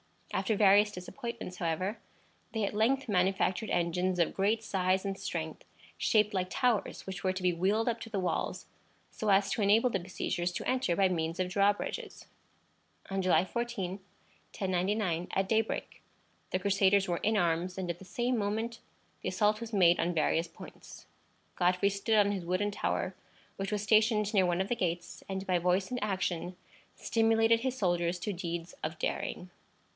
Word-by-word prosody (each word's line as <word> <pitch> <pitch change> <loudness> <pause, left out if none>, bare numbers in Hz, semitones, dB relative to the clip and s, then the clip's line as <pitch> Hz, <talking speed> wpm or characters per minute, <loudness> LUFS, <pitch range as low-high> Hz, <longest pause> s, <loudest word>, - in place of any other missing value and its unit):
After 220 - +1
various 205 +1 +5
disappointments, 210 0 -7
however, 185 +5 -2 0.5
they 220 -2 -1
at 200 - -1
length 255 +6 +2
manufactured 190 +2 +1
engines 180 +1 0
of 170 - +2
great 215 +3 +1
size 190 -1 0
and 195 -1 -2
strength, 160 -4 -5 0.3
shaped 210 -1 +2
like 185 -1 0
towers, 245 -6 0
which 190 -2 -6
were 185 -1 +1
to 185 0 -5
be 180 -1 +3
wheeled 200 +7 +1
up 235 -1 0
to 225 - -8
the 205 -3 -2
walls, 175 -3 -2 0.5
so 215 - -3
as 195 0 +4
to - - -1
enable 220 +5 +4
the - - 0
besiegers 175 0 -2
to - - -4
enter 255 -9 +1
by 195 0 +3
means 165 -1 -2
of 185 -1 0
drawbridges. 200 +2 0 0.9
On 195 0 0
July 185 -1 +3
14, 205 -4 -3 0.6
1099, 185 -2 0
at 195 0 +1
daybreak, 225 0 -1 0.5
the - - 0
Crusaders 195 0 +3
were 175 -1 0
in 215 +4 +1
arms, 175 0 0
and 185 -1 -3
at 170 - -9
the 190 - -12
same 240 +7 -1
moment 220 +3 -2 0.4
the - - -2
assault 210 +1 +1
was 230 -1 -7
made 175 -4 +5
on 175 - +1
various 165 +1 +1
points. - - -13 0.5
Godfrey 180 +2 +3
stood 200 +3 +1
on 205 -1 +4
his 190 -4 -3
wooden 185 +4 0
tower, 190 -1 -1 0.4
which 195 +1 -3
was 210 -1 -1
stationed 215 0 +3
near 190 -3 +4
one 175 +1 +1
of 190 - -3
the 240 - +1
gates, 175 -4 -3
and 190 0 -3
by 180 -2 +2
voice 180 +3 +1
and 250 -3 -2
action 185 -3 -2 0.4
stimulated 225 0 +3
his 260 +1 -2
soldiers 175 -4 +1
to 205 +3 -3
deeds 170 -1 -5
of 155 +1 -4
daring. 180 +2 -3
195 Hz, 175 wpm, -31 LUFS, 180-215 Hz, 0.9 s, various